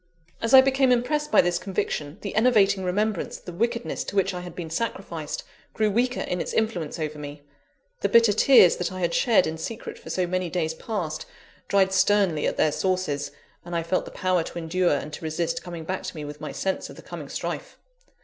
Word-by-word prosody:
As 230 +3 +4
I 260 - +11
became 265 -1 +3
impressed 295 +5 +1
by - - +7
this 175 0 0
conviction, 180 -4 -3
the 200 - -5
enervating 205 -4 +4
remembrance 200 +2 -1
of - - -21
the 180 - -7
wickedness 235 +5 -1
to - - -6
which 195 0 +2
I 180 - -4
had 175 -2 -9
been 165 -3 -6
sacrificed, 170 -6 -3 0.3
grew 215 -1 +2
weaker 245 +4 +1
in 180 -1 -2
its - - -4
influence 190 -9 -1
over 155 -2 -4
me; 145 0 -8 0.6
the - - 0
bitter 230 -2 +6
tears 215 -5 +6
that 180 - -2
I 185 - -6
had 170 -1 0
shed 230 -3 +4
in 160 0 -4
secret 225 +7 -6
for - - -11
so 185 - 0
many 180 0 -1
days 160 -2 -1
past, 160 -5 -4 0.4
dried 190 -1 +3
sternly 190 -5 +3
at - - -2
their 155 - +3
sources; 180 -6 -1 0.3
and 175 0 -6
I 165 - 0
felt 175 +3 0
the - - -8
power 185 -2 0
to 165 - -7
endure 175 +2 +1
and 150 +2 -5
to - - -7
resist 160 +1 -2
coming 170 -2 -7
back 185 +3 -3
to - - -6
me 150 -2 -5
with 150 0 -9
my - - -5
sense 190 0 -2
of - - -10
the - - -13
coming - - -8
strife. - - -5
185 Hz, 215 wpm, -25 LUFS, 165-215 Hz, 0.6 s, I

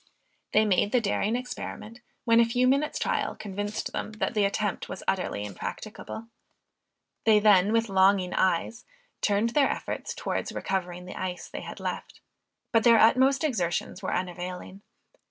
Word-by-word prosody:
They 215 +1 +4
made 205 0 +2
the 250 - +4
daring 215 +1 0
experiment, 245 -2 -6 0.2
when 230 -1 +5
a - - +7
few 245 +2 +1
minutes' 280 +3 +1
trial - - -1
convinced 205 +1 -4
them, 215 - -4
that 215 - -2
the 210 -3 +2
attempt 200 0 -2
was - - -7
utterly 180 - -1
impracticable. 215 - -7 1.0
They 220 -1 +5
then 205 -2 +5
with 230 0 +2
longing 190 -1 +3
eyes, 190 +5 0 0.4
turned 210 +3 +1
their 280 +1 +3
efforts - - -4
towards - - -3
recovering 180 -2 -3
the 180 - -8
ice 180 -1 -4
they - - -7
had - - -8
left, - - -5 0.5
but 225 -2 +3
their 235 -1 +7
utmost 260 +5 +4
exertions 185 - -1
were 190 - -3
unavailing. 180 +1 -5
210 Hz, 155 wpm, -27 LUFS, 185-230 Hz, 1.0 s, a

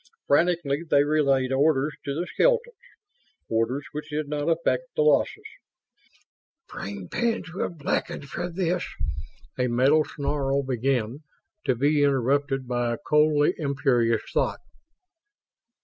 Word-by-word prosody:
Frantically 165 -1 +2
they 145 0 +5
relayed 140 -3 +2
orders 145 +1 +2
to 140 -1 -2
the 175 - -1
skeletons; 485 - +1 0.8
orders 115 +5 0
which 150 0 -6
did 150 0 -3
not 145 +2 -2
affect 165 - +1
the 465 - +2
losses. 430 -2 +2 1.2
"Brain 100 -2 -7
pans 230 - -2
will 185 - -2
blacken 155 -3 -3
for 175 +5 -5
this 175 0 -1 0.4
..." - - -28
a 125 - +2
mental 135 +6 +4
snarl 140 -1 -1
began, 130 -1 -1 0.5
to 130 - +2
be 145 +4 +2
interrupted 135 0 +1
by 120 -1 0
a - - -4
coldly 150 0 +3
imperious 130 -6 +1
thought. - - 0
145 Hz, 125 wpm, -25 LUFS, 130-155 Hz, 1.2 s, they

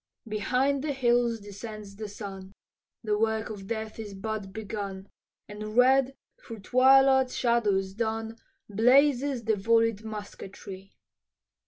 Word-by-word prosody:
Behind 250 +6 0
the 300 -2 -1
hills 240 -3 +1
descends 205 0 -9
the 215 +1 -6
sun, 195 -2 -9 0.5
The 210 -1 0
work 220 0 0
of 195 -2 -8
death 220 0 -5
is 205 -3 -7
but 205 0 -5
begun, 200 -2 -6 0.4
And 215 +1 -7
red 265 +1 +4 0.3
through 225 -3 -9
twilight's 265 +3 +4
shadows 205 -6 +1
dun 225 +1 -3 0.3
Blazes 255 +4 +3
the 220 - +1
vollied 225 +1 +2
musketry. 200 -2 -9
220 Hz, 120 wpm, -27 LUFS, 205-245 Hz, 0.5 s, red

